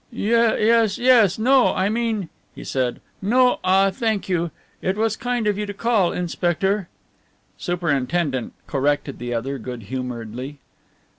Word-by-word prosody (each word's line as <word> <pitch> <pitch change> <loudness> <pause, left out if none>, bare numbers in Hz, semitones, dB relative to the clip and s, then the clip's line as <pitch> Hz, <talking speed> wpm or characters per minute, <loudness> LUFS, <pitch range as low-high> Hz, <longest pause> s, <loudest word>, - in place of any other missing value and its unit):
"Yes, 230 -1 +2
yes 240 -7 +5
no, 255 +3 +4
I 190 - +1
mean," 220 -4 -1 0.3
he - - -9
said, 130 -2 -2 0.2
"no 250 +5 +3
ah 195 +1 +4
thank 220 0 -1
you. 175 -2 0 0.3
It 190 +2 -1
was 220 0 +1
kind 245 -1 -2
of 205 -1 0
you 210 - -2
to 205 - -6
call, 215 -5 +2
inspector 180 +2 -1 0.3
" - - -39 0.3
"Superintendent," 145 -5 -1
corrected 145 0 -1
the 120 0 -3
other 135 +4 -3
good 120 -1 -7
humouredly. 125 +3 -6
190 Hz, 140 wpm, -22 LUFS, 140-220 Hz, 0.3 s, yes